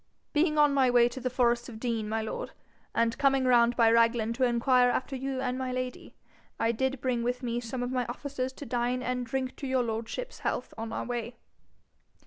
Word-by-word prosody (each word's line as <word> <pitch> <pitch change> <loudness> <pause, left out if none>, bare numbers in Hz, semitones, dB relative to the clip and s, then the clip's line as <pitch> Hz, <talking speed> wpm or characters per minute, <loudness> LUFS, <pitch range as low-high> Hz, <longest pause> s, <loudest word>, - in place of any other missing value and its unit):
'Being 305 0 +2
on 295 -1 +5
my 265 -2 +4
way 240 -1 +5
to 245 - -6
the 255 0 -2
forest 240 -1 +1
of 220 -2 -9
Dean, 225 -3 -2
my 220 0 -1
lord, 220 - -5 0.4
and 230 0 +2
coming 270 -1 +3
round 240 -1 +4
by 230 -1 +5
Raglan 230 -1 +3
to 260 +2 -1
inquire 245 +1 +4
after 260 +2 -2
you 265 0 -3
and 255 -1 -2
my 260 -1 -2
lady, 255 0 -5 0.4
I 225 - +2
did 265 +2 -1
bring 250 -2 0
with 245 +2 -2
me 240 -1 -1
some 245 +1 -4
of 245 - -3
my 250 -2 -1
officers 260 +1 -4
to 285 - -9
dine 245 +1 -1
and 250 -1 -2
drink 260 +2 -3
your 260 -2 +1
lordship's 230 - -4
health - - -3
on 225 0 -5
our - - -3
way.' 240 0 -4
245 Hz, 205 wpm, -29 LUFS, 235-260 Hz, 0.4 s, on